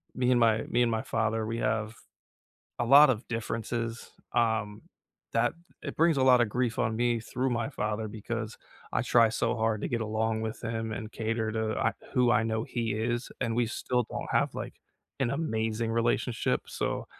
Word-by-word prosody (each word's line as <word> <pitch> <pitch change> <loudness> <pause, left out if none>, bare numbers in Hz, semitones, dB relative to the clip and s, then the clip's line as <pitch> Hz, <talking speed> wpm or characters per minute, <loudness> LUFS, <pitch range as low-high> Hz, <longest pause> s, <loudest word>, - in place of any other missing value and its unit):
me 125 0 +2
and 125 - +4
my 115 -1 +3
me 120 - +2
and 120 - +1
my 110 0 0
father, 110 0 -1
we 115 +1 -3
have 110 0 -1 0.8
a 120 - +1
lot 140 +5 +8
of 120 -2 0
differences, 115 0 -3 0.2
um, 110 -3 +1 0.5
that - - +2 0.3
it - - -6
brings 165 -1 +4
a - - +3
lot 130 -1 +6
of 115 - +1
grief 120 0 -1
on 110 -2 +1
me 120 0 +2
through 125 +3 -2
my 120 -1 -1
father 105 +1 -2
because 110 +1 -5 0.3
I - - +2
try 115 -2 +5
so 115 - 0
hard 110 -1 0
to - - -1
get 120 - -1
along 110 +1 -1
with 110 0 -4
him 115 -1 -3
and 110 -1 -5
cater 110 0 -2
to 110 0 -1
I 115 - +2 0.2
who 125 -3 +3
I 120 - +4
know 110 0 -1
he 115 -3 -2
is, 120 +3 -2
and 115 -3 0
we 120 -1 +2
still 125 +2 -1
don't - - -4
have, - - +2
like, - - -5 0.4
an 130 -4 +1
amazing 115 -6 -1
relationship, 115 +1 +1
so - - -3
115 Hz, 190 wpm, -29 LUFS, 110-120 Hz, 0.8 s, lot